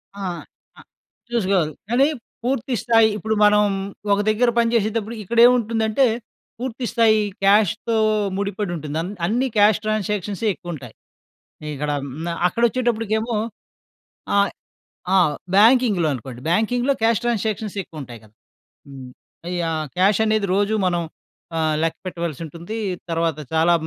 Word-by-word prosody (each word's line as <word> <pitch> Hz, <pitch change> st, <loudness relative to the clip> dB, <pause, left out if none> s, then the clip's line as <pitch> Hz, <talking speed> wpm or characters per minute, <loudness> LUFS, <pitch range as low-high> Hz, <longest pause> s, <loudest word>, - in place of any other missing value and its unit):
ఆ! 200 Hz, -, -7 dB, 0.6 s
ఆ! -, -, -12 dB, 0.5 s
చూసుకోవాలి. 190 Hz, -8 st, +1 dB, 0.2 s
కానీ 255 Hz, +4 st, +4 dB, 0.4 s
పూర్తి 260 Hz, 0 st, -1 dB
స్థాయి, 225 Hz, -1 st, +5 dB
ఇప్పుడు 220 Hz, +2 st, -1 dB
మనం 210 Hz, 0 st, +5 dB, 0.5 s
ఒక 200 Hz, -, +1 dB
దగ్గర 235 Hz, +3 st, +3 dB
పనిచేసేటప్పుడు 230 Hz, -1 st, 0 dB
ఇక్కడేంముంటుందంటే, 230 Hz, +1 st, +3 dB, 0.5 s
పూర్తి 250 Hz, 0 st, -4 dB
స్థాయి 225 Hz, -2 st, +4 dB, 0.3 s
క్యాష్‌తో 210 Hz, +3 st, +3 dB, 0.4 s
ముడిపడి 200 Hz, -1 st, -2 dB
ఉంటుంది. 155 Hz, -1 st, -5 dB
అన్ 180 Hz, +4 st, -5 dB
అన్నీ, 240 Hz, +8 st, +1 dB
క్యాష్ 210 Hz, 0 st, +5 dB
ట్రాన్సాక్షన్సే 210 Hz, -1 st, -1 dB
ఎక్కువుంటాయి. 150 Hz, -11 st, -8 dB, 0.8 s
ఇక్కడ 150 Hz, +1 st, -2 dB, 0.3 s
మ్న 170 Hz, -, -4 dB, 0.2 s
అక్కడొచ్చేటప్పటికేమో, 230 Hz, 0 st, 0 dB, 1.0 s
ఆహ్, 200 Hz, 0 st, +3 dB, 0.6 s
ఆ! -, -, +6 dB, 0.4 s
బ్యాంకింగ్‌లో 220 Hz, -6 st, +5 dB
అనుకోండి. 125 Hz, -1 st, -8 dB
బ్యాంకింగ్‌లో 245 Hz, +8 st, +1 dB
క్యాష్ 230 Hz, -1 st, +3 dB
ట్రాన్సాక్షన్స్ 220 Hz, -3 st, -2 dB
ఎక్కువుంటాయి 125 Hz, -7 st, -10 dB
గదా! 105 Hz, 0 st, -22 dB, 0.6 s
హ్మ్. 130 Hz, -2 st, -10 dB, 0.5 s
యాహ్! 160 Hz, -2 st, -1 dB
క్యాష్ 195 Hz, +3 st, +3 dB
అనేది 215 Hz, -2 st, +1 dB
రోజు 205 Hz, +2 st, +1 dB
మనం 175 Hz, -1 st, 0 dB, 0.6 s
ఆహ్, 155 Hz, -1 st, +1 dB
లెక్కపెట్టవలసి 170 Hz, -2 st, -4 dB
ఉంటుంది. 170 Hz, +7 st, -8 dB, 0.4 s
తర్వాత 165 Hz, -2 st, 0 dB, 0.2 s
చాలా 165 Hz, +2 st, +4 dB
210 Hz, 115 wpm, -21 LUFS, 170-230 Hz, 1.0 s, ఆ